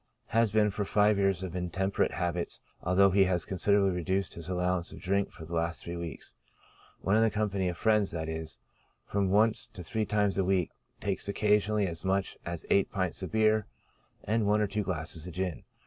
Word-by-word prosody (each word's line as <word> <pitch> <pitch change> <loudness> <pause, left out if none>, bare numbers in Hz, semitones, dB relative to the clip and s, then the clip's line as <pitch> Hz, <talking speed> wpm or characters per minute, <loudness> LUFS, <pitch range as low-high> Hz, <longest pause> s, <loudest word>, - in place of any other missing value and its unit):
Has 115 +1 +3
been 105 0 +3
for 105 - -2
five 105 0 +3
years 95 -2 +1
of 90 -1 -5
intemperate 95 +2 0
habits, 85 +2 -2 0.2
although 95 +2 +4
he 95 +1 +5
has 90 -4 0
considerably 100 +1 +2
reduced 95 +2 -1
his 85 +1 -8
allowance 90 -1 0
of - - -10
drink 100 +2 0
for 80 - -10
the 85 - -9
last 85 +1 -1
three 85 - -5
weeks. 85 -1 -7 0.7
When 95 - +2
in 110 0 +4
company 100 -3 0
of 85 - -5
friends, 105 -3 +3
that 80 -1 -4
is, 80 0 -5 0.5
from 100 -1 0
once 110 +4 +3
to 90 - -8
three 110 +5 -2
times 105 -1 +1
a - - +3
week, 95 -2 +1 0.3
takes - - -3
occasionally 105 0 +2
as 85 -3 -5
much 95 0 0
as 85 -1 -5
eight 100 - +3
pints 95 -4 -2
of 95 - -5
beer, 110 -1 +3 0.6
and 110 0 +1
one 105 +1 +3
or 105 - +3
two 105 +1 -2
glasses 85 -3 -4
of 90 - -8
gin. 90 -7 -3
95 Hz, 195 wpm, -30 LUFS, 90-105 Hz, 0.7 s, he